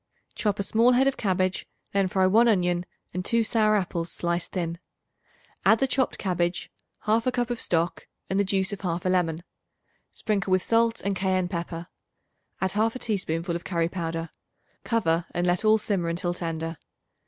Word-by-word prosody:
Chop 210 -2 -1
a 200 - -1
small 230 +5 +4
head 255 +2 +4
of 275 - +2
cabbage, 185 -3 0 0.2
then 195 -1 +2
fry 190 0 +2
1 225 +6 +5
onion 180 -4 +2 0.3
and 180 +1 -2
2 230 +4 +2
sour 215 -1 +3
apples 175 -4 -1
sliced 170 0 -2
thin. 170 -2 -2 0.8
Add 220 - +6
the 270 - +2
chopped 260 0 0
cabbage, 175 -2 -1 0.3
1/2 225 +4 +2
cup 245 -1 -1
of 240 - -3
stock 170 0 0 0.2
and 190 - 0
the - - +4
juice 195 0 0
of 200 - -5
1/2 175 -1 -2
lemon; 170 -2 0 0.7
sprinkle 205 -3 -1
with 185 0 +3
salt 230 0 +2
and 200 0 -1
cayenne 185 -1 +1
pepper; 170 -1 -4 0.7
add 190 -1 0
1/2 225 +4 0
teaspoonful 175 -6 -1
of 170 - -4
curry 170 -2 0
powder. 165 -2 -4 0.5
Cover 170 -8 +1
and 175 - +1
let 175 +3 +1
all 215 0 +5
simmer 195 -5 -1
until 175 +1 -1
tender. 165 -1 -4
185 Hz, 170 wpm, -26 LUFS, 170-215 Hz, 0.8 s, Add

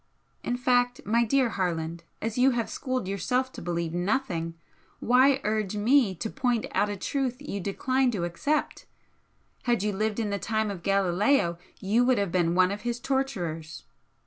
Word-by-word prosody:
In 245 - -1
fact, 245 0 +2
my 230 +3 +3
dear 260 +1 +2
Harland, 170 -4 -2 0.2
as 225 0 -2
you 255 +2 +5
have 230 - -2
schooled 255 -7 -3
yourself 250 +7 -1
to - - -9
believe 170 -1 -2
NOTHING, 175 -3 -1 0.4
why 260 +3 +4
urge 215 -2 -1
me 225 -2 +3
to 200 - -3
point 245 -2 0
out 210 - +2
a 205 - -4
truth 255 +4 -2
you 290 -8 -5
decline 255 +7 0
to 205 -7 -2
accept? 230 - -2 0.8
Had 240 -5 +1
you 210 -1 0
lived 215 +2 -1
in 215 -3 -1
the 200 - -1
time 220 0 -1
of 190 -4 -7
Galileo 195 0 +2 0.2
you 215 +5 +2
would 250 -1 +3
have 200 -3 0
been 175 -1 +1
one 185 +1 +4
of 205 +1 -4
his 240 0 -2
torturers!" 185 - -3
215 Hz, 170 wpm, -27 LUFS, 185-250 Hz, 0.8 s, you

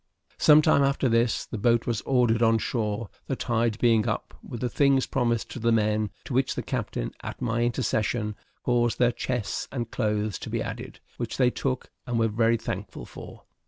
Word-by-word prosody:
Some 155 0 +7
time 140 - +4
after 140 -1 +2
this, 115 0 +2
the 110 - -6
boat 115 +1 +3
was 115 -3 -1
ordered 120 -3 +3
on 115 -1 +5
shore, 110 -1 -2 0.2
the 135 - -1
tide 115 -3 0
being 115 -2 +3
up, 110 - -3
with 120 - -7
the 125 - +1
things 135 +1 +3
promised 115 -2 -1
to - - -6
the 115 +1 +2
men; 105 -1 +2 0.2
to - - -5
which - - +1
the - - -3
captain, - - -3
at - - -7
my 115 +1 -1
intercession, 110 -3 0 0.3
caused 120 -1 +1
their 120 -1 +4
chests 120 -2 -3
and 120 -4 -4
clothes 105 -3 -1
to - - -7
be - - -1
added, - - -6 0.2
which - - -4
they 125 -2 +4
took, 130 0 -3 0.2
and 120 -1 -1
were 115 0 +3
very 115 +2 +2
thankful 105 -3 -5
for. - - -11
115 Hz, 195 wpm, -26 LUFS, 110-125 Hz, 0.3 s, Some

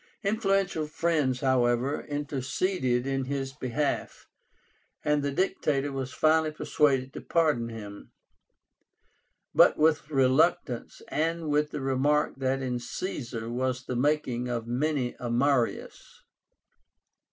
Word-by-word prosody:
Influential 195 -6 +1
friends, 150 -5 0
however, 130 +1 +2
interceded 145 -1 -1
in 135 -1 -1
his 135 0 -3
behalf, 140 +1 -2 0.8
and 150 -1 +2
the 140 - -1
Dictator 145 -4 0
was 135 -1 -4
finally 155 +2 +3
persuaded 140 -3 +1
to - - -7
pardon 150 -9 +1
him; 105 -3 -9 1.4
but - - +6
with 155 0 +2
reluctance, 135 -2 +1
and 165 0 -1
with 150 0 +2
the 145 - -5
remark 135 +3 +1
that 135 0 -1
in 125 -1 -2
Caesar 120 - -5
was 125 +1 -2
the 125 - -3
making 125 -2 0
of 120 -2 -3
many 130 +1 -1
a 120 - -4
Marius. 125 0 -1
135 Hz, 115 wpm, -28 LUFS, 125-150 Hz, 1.4 s, but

